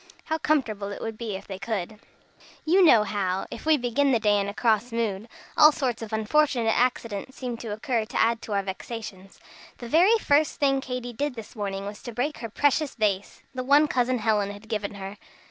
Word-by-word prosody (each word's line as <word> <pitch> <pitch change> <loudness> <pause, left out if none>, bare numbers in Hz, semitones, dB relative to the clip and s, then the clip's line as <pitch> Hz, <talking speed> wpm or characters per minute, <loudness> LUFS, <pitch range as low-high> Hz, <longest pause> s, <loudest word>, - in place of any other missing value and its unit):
How 315 0 -1
comfortable 215 -11 0
it - - -6
would 225 -1 -5
be 215 -3 -4
if 190 - -8
they 190 -1 -7
could! 205 0 -4 0.7
You 365 +4 +5
know 235 -11 +7
how, 195 -2 -2
if - - -8
we 315 -1 +5
begin 270 +2 +1
the 235 - +3
day 210 -2 +3
in 200 0 -1
a - - -5
cross 230 0 +1
mood, 225 -2 -2 0.3
all 300 - +8
sorts 255 -6 -2
of 225 -1 -7
unfortunate 225 +1 +2
accidents 245 -1 -1
seem 250 -2 -4
to 230 - -8
occur 220 +2 -1
to 215 - -4
add 230 0 +2
to 215 - -5
our 200 -1 +1
vexations. 195 0 -7 0.4
The 240 - -8
very 360 - +5
first 300 -6 +2
thing 275 -1 +2
Katy 250 -2 -5
did 285 +2 -2
this 225 0 -10
morning 200 -2 -4
was 205 +1 -7
to 240 - -7
break 285 +5 -2
her 230 - -5
precious 290 +5 +1
vase 205 -4 -1
the 255 -1 -3
one 285 +3 +5
Cousin 255 -2 +1
Helen 210 -3 +1
had 205 +2 -10
given 210 -2 -3
her. 195 +1 -7
230 Hz, 210 wpm, -26 LUFS, 205-265 Hz, 0.7 s, all